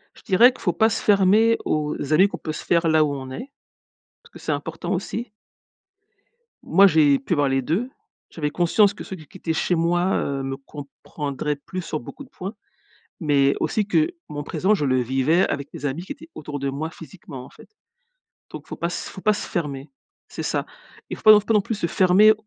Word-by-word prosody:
Je - - -18
dirais 230 +6 +6
que 255 - -16
faut - - 0
pas 220 0 +3
se - - -3
fermer 210 +3 +4
aux 150 -1 -1 0.2
amis 190 +6 +6
qu'on 175 -5 -7
peut 155 - -4
se 155 - -7
faire 170 -1 +2
là 155 -1 +4
où 145 - -1
on 130 -1 -7
est, 250 - -8 0.7
parce 475 0 -21
que - - -12
c'est - - -3
important, - - -4
aussi. 235 0 -4 1.3
Moi, 195 +4 +6
j'ai 150 -5 +4
pu 140 - -2
avoir 145 -3 +2
les 135 0 +1
2. 180 - -1 0.4
J'avais 150 -3 -3
conscience 195 +5 +3
que - - -9
ceux 190 - -7
qui 155 -4 -14
qui 190 - -13
étaient 165 -3 -2
chez 175 - 0
moi, 175 +2 +1
heu, 140 -1 -2
me 135 0 -4
comprendraient 145 +1 -5
plus 185 +6 -7
sur 155 -3 -4
beaucoup 150 - -10
de 260 - -17
points. 190 +3 -7 0.7
Mais 140 -4 +3
aussi, 210 -2 0
que 310 +9 +2 0.2
mon 145 0 -5
présent, 195 +7 +1
je 150 - -1
le 130 -1 +2
vivais 135 +9 +2
avec 140 0 -4
mes 145 - -6
amis 145 +5 -2
qui 190 - -10
étaient 320 +3 -9
autour 150 -1 -6
de 140 0 -2
moi, 145 +4 -4
physiquement, 160 -6 -11
en - - -14
fait. - - -17 0.8
Donc, - - -9
faut - - -7
pas - - -2
s 175 - -5
faut 190 - -10
pas 215 - +3
se - - -5
fermer, 145 -5 -4 0.4
c'est - - -6
ça. - - -2 0.4
Il - - -4
faut - - -16
pas 215 - +9
faut 210 - +7
pas 215 +2 -1
non 210 - +5
plus 215 +3 -3
se 185 - -1
fermer 190 +5 +5
165 Hz, 220 wpm, -23 LUFS, 145-200 Hz, 1.3 s, pas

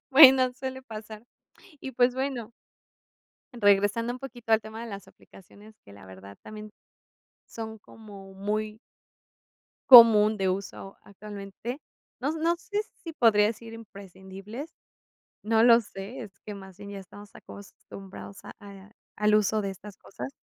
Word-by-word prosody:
Bueno, 265 -2 +8
suele 260 0 -6
pasar, 215 -1 -10 0.6
y 265 - -7
pues 245 0 +2
bueno. 260 -4 -4 1.0
Regresando 205 +1 +2
un 250 - -8
poquito 245 -4 -6
al 220 - +5
tema 220 +1 -9
de 235 - -8
las 200 -1 -9
aplicaciones, 205 +3 -18
que 100 - -16
la 100 -1 -15
verdad 95 +1 -13
también 215 0 -10 0.8
son 220 -1 -8
como 200 -2 -14
muy 210 +2 -3 1.1
común 220 -4 +9
de 195 -2 -1
uso 195 +1 -5
actualmente. 205 +5 -8 0.4
No 265 - -1
s 320 - -4
no 335 +2 +1
sé 410 +4 -4 0.2
si 330 - -6
podría 225 -8 +4
decir 225 +1 -6
imprescindibles, 200 - -11 0.7
no 220 +1 +2
lo 235 0 +7
sé, 200 +3 -9
es 195 -4 -12
que 210 - -9
más 190 -2 -13
bien 205 0 -10
ya 200 - -7
estamos 205 +2 -14
acostumbrados 195 -1 -12
a - - -9
a, 200 0 -13 0.3
al 210 0 +3
uso 215 +1 +1
de 195 -1 -3
estas 195 +1 -12
cosas. 125 -7 -9
215 Hz, 145 wpm, -27 LUFS, 195-235 Hz, 1.1 s, común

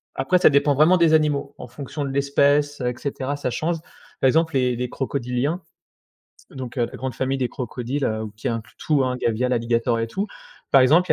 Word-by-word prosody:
Après, 135 +7 +2
ça - - +7
dépend 145 0 +3
vraiment 155 +6 +5
des 165 -2 +4
animaux. 150 -2 +1
En 125 - -8
fonction 140 +4 -6
de 140 - -3
l'espèce, 140 +1 +2
heu, 125 - +1
et - - -3
cetera, 140 -1 -3
ça 145 - -2
change. 165 +7 -1 0.4
Par - - +5
exemple, 160 +4 +2
les 125 -2 +2
les 125 0 -3
crocodiliens, 135 +5 -2 0.9
donc 130 -1 -7
heu, 120 - +2
la - - -9
grande 130 -1 -4
famille 135 +1 0
des 125 -2 0
crocodiles, 125 +2 -4
heu, 110 0 -1
qui 110 - -7
inclut 115 -1 -5
tout 150 -3 +1
hein, 125 0 -1
gavial, 125 +1 0
alligator 115 0 +1
et 115 - -1
tout. 195 - -3 0.4
Par 135 - +7
exemple, 160 +8 +4
il - - +9
135 Hz, 210 wpm, -23 LUFS, 125-145 Hz, 0.9 s, il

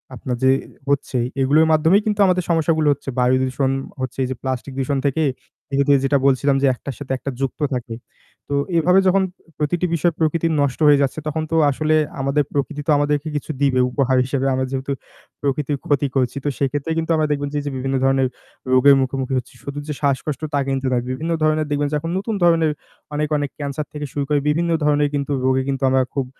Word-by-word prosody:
আপনার 125 0 -3
যে 130 - +6 0.4
হচ্ছে, 140 -2 0 0.2
এগুলোর 150 +4 +4
মাধ্যমেই 165 +6 +4
কিন্তু 210 -1 -1
আমাদের 180 -1 +2
সমস্যাগুলো 160 -2 +2
হচ্ছে। 135 - -9
বায়ু 125 +1 +4
দূষণ 130 +1 0 0.3
হচ্ছে, 130 -1 -4
এই - - -1
যে - - -2
প্লাস্টিক 130 0 -4
দূষণ 135 +1 0
থেকে 145 +3 +1 0.5
এ - - 0
দে 145 - +6
যেটা 140 +1 +3
বলছিলাম 140 +1 +3
যে 140 - +4
একটার 130 0 -7
সাথে 140 -2 -7
একটা 140 - -5
যুক্ত 135 +3 -2
থাকে। 120 -2 -4 0.5
তো - - -2 0.2
এভাবে 180 +4 +4
যখন 190 +1 +4 0.3
প্রতিটি 170 +4 0
বিষয় 170 +1 +1
প্রকৃতির 165 +1 +1
নষ্ট 140 0 -1
হয়ে 145 -1 +6
যাচ্ছে, 140 +3 0
তখন 155 +1 -2
তো - - +1 0.2
আসলে 155 +3 +1 0.3
আমাদের 140 +2 +1
প্রকৃতি 145 +1 -2
তো - - +3
আমাদেরকে 145 +1 0
কিছু 145 +2 -3
দিবে 135 -2 +3
উপহার 130 -1 +1
হিসেবে। 135 +1 -1
আমরা 130 0 0
যেহেতু 135 +1 -3 0.5
প্রকৃতির 145 0 -1
ক্ষতি 145 -1 +1
করছি 130 +1 0
তো - - +2
সেক্ষেত্রে 145 +3 -1
কিন্তু 165 0 -1
আমরা 155 -1 +1
দেখবেন 145 -1 -1
যে 150 - -1
এই - - -10
যে 145 - -2
বিভিন্ন 135 +1 -2
ধরনের 135 -1 +3 0.5
রোগের 140 +2 +7
মুখোমুখি 130 0 -2
হচ্ছি। 125 - -5
শুধু 140 +1 -5
যে 150 - -2
শ্বাসকষ্ট 140 +1 -1
তা 145 - +2
কিন্তু 135 0 -1
না। - - +2
বিভিন্ন 160 +6 -3
ধরণের 155 0 +2
দেখবেন 145 0 +1
যে - - 0
এখন 165 +3 -4
নতুন 205 +3 -2
ধরনের 165 -2 +4 0.4
অনেক, 150 +1 0
অনেক 145 -1 -2
ক্যান্সার 145 +1 -4
থেকে 150 0 -4
শুরু 145 - -1
করে 150 - +3
বিভিন্ন 170 +3 +1
ধরনের 145 -1 +2
কিন্তু 140 0 -2
রোগে 130 0 +2
কিন্তু 135 -1 -2
আমরা 130 0 +3
খুব 135 -2 -1
145 Hz, 205 wpm, -21 LUFS, 135-155 Hz, 0.5 s, রোগের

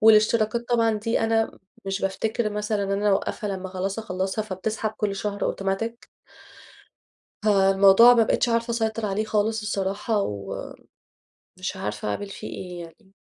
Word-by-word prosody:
والإشتراكات 220 +2 +4
طبعًا 230 -2 +3
دي 225 +2 -1
أنا 225 0 +1 0.3
مش 195 0 -2
بافتكِر 215 +3 -1
مثلًا 210 0 -1
إن 195 - -3
أنا 205 +1 +1
أوقفها 205 +2 -1
لمّا 190 -1 -4
خلاص 190 +3 -3
اخلصها، 190 0 -2
فبتسحب 215 +2 -3
كل 210 -2 -2
شهر 205 0 -3
أوتوماتيك. 195 +5 -2 1.4
فالموضوع 195 +3 +7
ما 230 - +5
بقيتش 230 +2 +1
عارفة 230 0 0
أسيطر 225 -1 -1
عليه 205 +2 -1
خالص 220 +1 0
الصراحة، 200 +1 -1
ومش 100 - -6 0.9
عارفة 105 0 -4
أعمل 105 - -2
فيه - - -7
إيه 180 -1 -7
يعني؟ 190 +4 -18
210 Hz, 140 wpm, -25 LUFS, 195-225 Hz, 1.4 s, فالموضوع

